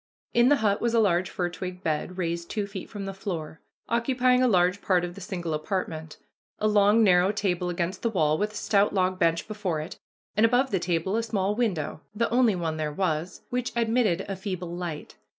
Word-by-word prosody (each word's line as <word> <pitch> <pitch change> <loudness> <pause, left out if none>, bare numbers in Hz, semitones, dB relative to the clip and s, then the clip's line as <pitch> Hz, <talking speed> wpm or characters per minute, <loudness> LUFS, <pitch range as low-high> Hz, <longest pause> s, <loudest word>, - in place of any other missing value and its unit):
In 240 +1 +5
the 290 - +6
hut 200 -1 +2
was 235 0 +1
a - - +5
large 185 -4 +2
fir 180 - -2
twig 180 +1 -7
bed, 160 +3 -2
raised 170 -1 -2
two 210 -2 -2
feet 195 -2 -8
from 205 -2 -6
the 195 - -4
floor, 165 -5 -5 0.3
occupying 250 +2 +2
a 255 - +4
large 180 -2 +3
part 180 -2 +2
of 175 - -7
the 200 - -11
single 175 -3 -4
apartment, 160 -1 -3 0.4
a 215 - +1
long 210 +1 +5
narrow 185 -1 +5
table 185 -4 -1
against 175 +2 -2
the 230 - +1
wall, 155 -8 +2
with 210 +5 -1
a - - -12
stout 205 -1 +2
log 185 -1 +1
bench 165 0 +1
before 205 -7 -2
it, 155 - -7 0.4
and 215 - +3
above 245 +3 +3
the 190 - +1
table 175 +3 -1
a - - +2
small 205 -3 0
window, 195 -10 -1
the 230 +2 +1
only 240 -4 +4
one 165 -3 -2
there 155 -1 -2
was, 165 +1 -2
which 250 0 -1
admitted 225 -6 +1
a 195 - -3
feeble 185 -3 -5
light. 175 -4 -6
190 Hz, 210 wpm, -26 LUFS, 175-215 Hz, 0.4 s, the